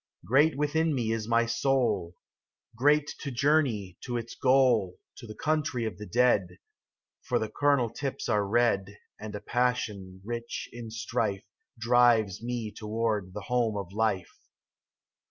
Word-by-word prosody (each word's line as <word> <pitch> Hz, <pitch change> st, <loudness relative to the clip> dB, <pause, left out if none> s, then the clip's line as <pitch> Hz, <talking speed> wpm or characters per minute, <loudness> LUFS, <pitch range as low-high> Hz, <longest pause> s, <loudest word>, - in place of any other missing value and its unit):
Great 145 Hz, +5 st, +3 dB
within 155 Hz, +1 st, +1 dB
me 115 Hz, -3 st, -1 dB
is 110 Hz, -1 st, -2 dB
my 115 Hz, 0 st, +3 dB
soul. 115 Hz, -8 st, 0 dB, 0.6 s
Great 145 Hz, +4 st, +3 dB
to 140 Hz, -, -4 dB
journey 125 Hz, -, +1 dB
to 120 Hz, -2 st, -3 dB
its 115 Hz, 0 st, -6 dB
goal. 125 Hz, -8 st, +3 dB, 0.2 s
To 120 Hz, -, -10 dB
the 110 Hz, -, -9 dB
country 150 Hz, -6 st, -1 dB
of 110 Hz, -, -5 dB
the 105 Hz, -, -7 dB
dead; 105 Hz, -7 st, +2 dB, 0.6 s
For -, -, 0 dB
the 110 Hz, -, -2 dB
cornel 140 Hz, -5 st, +2 dB
tips 135 Hz, +3 st, -4 dB
are 105 Hz, -3 st, +2 dB
red, 100 Hz, -2 st, +1 dB, 0.2 s
And 105 Hz, -1 st, -7 dB
a 105 Hz, -, -6 dB
passion 105 Hz, -7 st, -1 dB
rich 115 Hz, +1 st, -5 dB
in 120 Hz, -1 st, -7 dB
strife 105 Hz, -3 st, -2 dB, 0.3 s
Drives 115 Hz, -4 st, +3 dB
me 120 Hz, -2 st, -3 dB
toward 105 Hz, -4 st, -2 dB
the 105 Hz, -, -4 dB
home 115 Hz, -1 st, 0 dB
of 100 Hz, -2 st, -6 dB
life. 105 Hz, -4 st, -1 dB
115 Hz, 145 wpm, -28 LUFS, 105-125 Hz, 0.6 s, Great